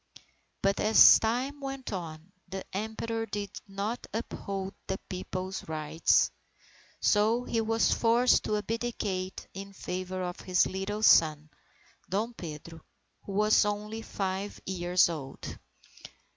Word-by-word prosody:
But 195 0 +2
as 215 +1 +8
time 250 +6 -1
went 270 -4 -5
on, 165 -1 -6 0.2
the 190 0 -6
Emperor 225 +2 -3
did 205 -2 -4 0.2
not 200 +4 -4
uphold 195 -3 -4
the 190 - -1
People's 185 0 -5
rights; 155 +1 +2 0.7
so 220 +3 +3
he 230 -2 0
was 225 +1 +2
forced 235 +2 +3
to 210 - +1
abdicate 210 -4 -3
in 195 +1 -8
favour 185 0 -4
of 180 0 -4
his 185 -1 +2
little 200 +3 -3
son, 155 -5 +5 0.6
Dom 215 +5 -1
Pedro, 165 -3 -8 0.4
who 200 - -6
was 210 +2 +4
only 210 +2 -3
five 195 -1 -3
years 180 -1 +3
old. 145 -6 -6
195 Hz, 120 wpm, -29 LUFS, 185-220 Hz, 0.7 s, as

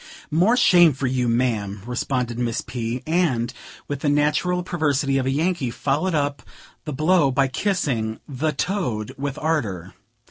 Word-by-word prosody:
"More 185 +11 +3
shame 175 - +6
for 135 +1 -3
you, 125 -1 0
ma'am," 110 -5 -1
responded 125 -1 -2
Miss 120 -1 -1
P.; 120 0 -4
and, 145 -8 +1 0.3
with 145 -1 -3
the 145 - 0
natural 150 +5 +1
perversity 145 -6 0
of 130 - -1
a - - +2
Yankee, 155 -1 0
followed 145 +9 -1
up 145 -1 -1 0.4
the 150 - -4
blow 155 +1 +3
by 135 +1 +2
kissing 130 - -1
"the 145 +3 -1
toad," 150 - -2
with 140 +1 -4
ardor. 105 - -2
140 Hz, 150 wpm, -23 LUFS, 120-160 Hz, 0.4 s, shame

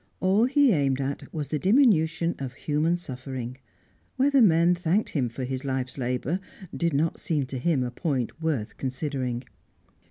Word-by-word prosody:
All 195 +5 +3
he 280 0 +4
aimed 140 -6 +1
at 140 +1 -4
was 150 -3 -4
the 150 - -1
diminution 175 - +3
of 135 -2 -5
human 155 +5 0
suffering; 130 -4 -6 0.6
whether 275 0 +4
men 170 -4 +5
thanked 180 +4 0
him 130 -6 -1
for 125 +3 -6
his 130 +1 -3
life's 130 -2 -2
labour 125 +6 -1 0.4
did 170 -4 0
not 160 +3 0
seem 150 -5 -1
to 130 0 -5
him 140 -1 +1
a 125 - -3
point 135 +1 -2
worth 145 -10 -2
considering. 130 -2 -3
145 Hz, 160 wpm, -26 LUFS, 130-170 Hz, 0.6 s, men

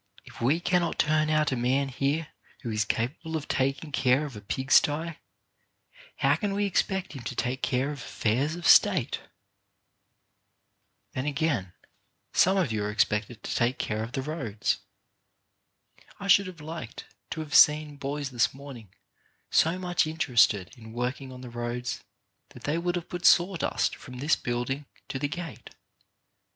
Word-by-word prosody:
If - - -13
we 140 +8 +3
cannot 175 -1 +1
turn 155 0 +2
out 155 -1 +2
a - - +1
man 130 +3 +1
here 140 +4 -1 0.3
who 115 - -3
is 105 -1 0
capable 140 +9 -2
of 155 - -7
taking 135 +3 -1
care 135 +1 +2
of 140 -6 -8
a 105 - -8
pig 130 +7 -4
sty, 160 +2 +3 1.0
how - - +2
can 205 -2 -2
we 205 0 +1
expect 190 -2 0
him 135 - -7
to 120 - -5
take 130 +1 -2
care 135 +2 0
of 145 - -7
affairs 125 +6 -1
of 175 -1 -7
State? - - +5 1.9
Then, 130 +3 -3
again, 140 - -1 0.6
some 190 +2 +4
of 175 -11 +1
you 105 -2 -1
are 105 - -1
expected 105 +1 0
to - - -3
take 120 +2 +1
care 110 0 -2
of 115 +2 -5
the 135 - -2
roads. 120 -10 -2 1.4
I 200 - -5
should 200 0 +6
have 175 -4 -10
liked 155 -7 -7 0.2
to 160 - -4
have 150 -2 -7
seen 150 -1 +6
boys 140 0 -4
this 120 +1 +1
morning 135 -7 -10 0.6
so 165 +3 +3
much 180 -3 +1
interested 120 - +2
in 110 -1 -11
working 125 +3 -3
on 125 0 -10
the 125 -2 -9
roads 120 +1 -4 0.5
that - - -14
they 150 +3 0
would 175 +1 -1
have 175 -1 -4
put 175 0 -6
sawdust 180 -1 +3
from 125 0 -10
this 145 +5 +2
building 125 +4 -3 0.2
to 135 - -3
the 145 - 0
gate. 170 +2 -7
140 Hz, 165 wpm, -27 LUFS, 120-160 Hz, 1.9 s, should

